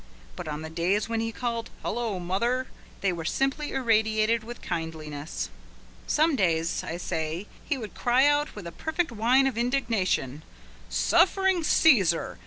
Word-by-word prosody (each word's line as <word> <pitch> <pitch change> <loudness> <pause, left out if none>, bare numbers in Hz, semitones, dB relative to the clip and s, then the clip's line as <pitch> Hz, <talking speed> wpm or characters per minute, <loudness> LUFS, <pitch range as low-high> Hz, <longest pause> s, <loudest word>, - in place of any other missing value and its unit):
But - - -7
on 150 +1 -4
the 160 - -7
days 180 +6 +1
when 230 -1 -1
he 225 0 -1
called: 230 -1 -3
"Hullo, 225 -3 -2
mother," 235 +9 0 0.4
they 195 -2 +1
were 170 -1 -5
simply 270 - -1
irradiated 220 -2 +2
with 240 +2 -8
kindliness. 160 -3 -5 0.6
Some 310 0 +3
days, 165 -6 +1
I 165 - -4
say, 160 +1 -3 0.2
he 285 - -1
would 220 -5 -7
cry 250 +3 +3
out 290 +1 +2
with 205 -4 -8
a 170 - -6
perfect 315 - -2
whine 240 +4 +3
of 255 -4 0
indignation: 225 - 0 0.5
"Suffering 360 - +3
Caesar! 195 - +3
225 Hz, 150 wpm, -27 LUFS, 170-260 Hz, 0.6 s, Some